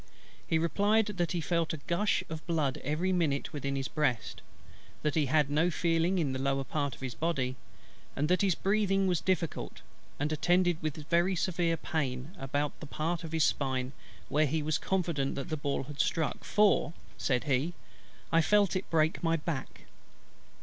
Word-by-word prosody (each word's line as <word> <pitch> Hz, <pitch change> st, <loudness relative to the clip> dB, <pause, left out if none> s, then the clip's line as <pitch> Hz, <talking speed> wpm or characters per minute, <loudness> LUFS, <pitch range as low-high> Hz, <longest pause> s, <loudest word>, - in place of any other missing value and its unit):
He 160 Hz, -, +2 dB
replied, 205 Hz, +7 st, +3 dB
that 185 Hz, -5 st, -2 dB
"he 175 Hz, -, -1 dB
felt 165 Hz, 0 st, 0 dB
a -, -, -3 dB
gush 200 Hz, +5 st, +1 dB
of 160 Hz, -1 st, -6 dB
blood 155 Hz, -6 st, 0 dB
every 160 Hz, +7 st, 0 dB
minute 155 Hz, -6 st, 0 dB
within 140 Hz, -2 st, -2 dB
his 135 Hz, -1 st, -2 dB
breast: 125 Hz, -9 st, -1 dB, 0.6 s
that 150 Hz, -1 st, +1 dB
he 150 Hz, -3 st, +2 dB
had 150 Hz, +1 st, +3 dB
no 160 Hz, +4 st, +3 dB
feeling 170 Hz, +2 st, +1 dB
in 145 Hz, -6 st, 0 dB
the 130 Hz, -, -3 dB
lower 135 Hz, 0 st, +1 dB
part 140 Hz, -1 st, -2 dB
of -, -, -19 dB
his 130 Hz, -2 st, -4 dB
body: 135 Hz, -6 st, -1 dB, 0.6 s
and 145 Hz, +2 st, 0 dB
that 180 Hz, +2 st, +3 dB
his 195 Hz, -4 st, +3 dB
breathing 195 Hz, -1 st, +2 dB
was 180 Hz, -3 st, +1 dB
difficult, 180 Hz, -4 st, -2 dB, 0.4 s
and 145 Hz, +2 st, 0 dB
attended 175 Hz, +2 st, +2 dB
with 155 Hz, -1 st, -4 dB
very 175 Hz, +2 st, +3 dB
severe 170 Hz, -1 st, 0 dB
pain 140 Hz, -1 st, -3 dB
about 145 Hz, +2 st, -2 dB
that 155 Hz, -, -8 dB
part 165 Hz, +3 st, -2 dB
of 165 Hz, -, -5 dB
the 165 Hz, -, -2 dB
spine 130 Hz, -4 st, +1 dB, 0.4 s
where 150 Hz, +1 st, +2 dB
he 155 Hz, +2 st, -1 dB
was 155 Hz, 0 st, 0 dB
confident 170 Hz, -8 st, 0 dB
that 140 Hz, +5 st, -5 dB
the 155 Hz, -, -1 dB
ball 145 Hz, -2 st, -2 dB
had 145 Hz, +1 st, -9 dB
struck; 160 Hz, -4 st, 0 dB
for," 210 Hz, -5 st, +3 dB, 0.2 s
said 125 Hz, -3 st, 0 dB
he, 145 Hz, +4 st, 0 dB, 0.6 s
"I 165 Hz, -, +5 dB
felt 205 Hz, +2 st, +3 dB
it 185 Hz, -, -3 dB
break 160 Hz, 0 st, +2 dB
my 165 Hz, -1 st, +2 dB
back." 155 Hz, -4 st, -4 dB
160 Hz, 180 wpm, -31 LUFS, 140-175 Hz, 0.6 s, I